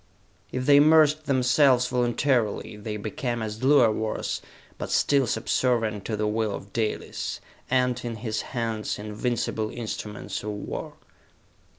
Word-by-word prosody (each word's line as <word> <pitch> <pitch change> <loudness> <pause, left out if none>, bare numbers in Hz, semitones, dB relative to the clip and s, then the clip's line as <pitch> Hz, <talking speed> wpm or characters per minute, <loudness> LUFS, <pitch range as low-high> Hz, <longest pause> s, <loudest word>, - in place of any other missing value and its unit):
If 130 0 -2
they 145 0 +7
immersed 155 0 +5
themselves 130 -1 +4
voluntarily, 120 -3 0
they 105 0 -5
became 120 +2 -3
as 110 0 -5
Luar 130 -5 +6
was, 110 0 -2 0.4
but - - -4
still 140 -3 +3
subservient 110 -2 0
to 110 - -2
the 105 - 0
will 105 -1 0
of 100 - -10
Dalis 110 -2 -2 0.3
and, 125 -1 +1
in 120 -1 -4
his 110 -1 -3 0.2
hands, 115 -2 -2
invincible 110 +1 -2
instruments 105 -3 -5
of 105 - -5
war! 105 -1 -5
115 Hz, 130 wpm, -26 LUFS, 110-130 Hz, 0.4 s, they